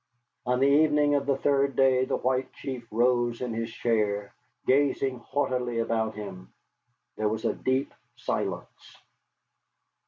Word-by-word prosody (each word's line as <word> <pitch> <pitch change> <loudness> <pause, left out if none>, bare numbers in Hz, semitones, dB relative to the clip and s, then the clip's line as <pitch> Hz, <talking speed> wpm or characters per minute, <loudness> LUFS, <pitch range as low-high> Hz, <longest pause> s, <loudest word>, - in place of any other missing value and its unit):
On 125 0 +2
the - - +5
evening 150 0 +4
of 140 -1 +1
the 140 -1 +2
third 140 -1 +1
day 130 -1 +4
the - - -1
White 130 0 -1
Chief 125 -4 -6
rose 120 +1 +1
in 125 -2 -3
his 115 0 -3
chair, 105 -4 -1 0.3
gazing 135 -1 +2
haughtily 125 -2 -1
about 115 -1 0
him. 95 -3 -8 0.7
There 110 -1 +1
was 110 +1 -3
a - - +2
deep 130 +1 -1 0.2
silence. - - -4
125 Hz, 135 wpm, -27 LUFS, 115-135 Hz, 0.7 s, the